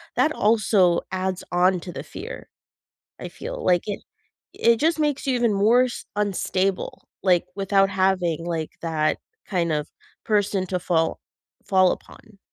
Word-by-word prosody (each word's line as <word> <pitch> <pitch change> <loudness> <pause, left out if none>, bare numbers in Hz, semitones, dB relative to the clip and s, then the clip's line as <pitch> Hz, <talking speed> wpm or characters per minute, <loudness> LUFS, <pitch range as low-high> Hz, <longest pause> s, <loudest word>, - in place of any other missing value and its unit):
that 310 - +3
also 205 - +3
adds 185 0 -2
on 180 +1 +3
to 180 - -7
the - - -7
fear, - - -8 0.7
I - - -5
feel. - - -7
Like, 175 -1 +3
it 205 -2 -3 0.5
it 230 0 +3
just 320 +5 +1
makes 295 -2 0
you 260 - +2
even 235 -3 +2
more 220 +5 +4
s 250 -1 -4
unstable, 195 -2 -1 0.2
like, 180 -3 +3
without 195 0 +2
having, 185 -4 +1
like, 165 -2 -3
that 155 -2 0 0.3
kind 170 -4 -1
of 150 0 -1 0.4
person 205 -3 +1
to 180 0 -1
fall 165 -2 0 0.5
fall 185 -2 +4
upon. 215 -4 -10
190 Hz, 150 wpm, -24 LUFS, 175-215 Hz, 0.7 s, more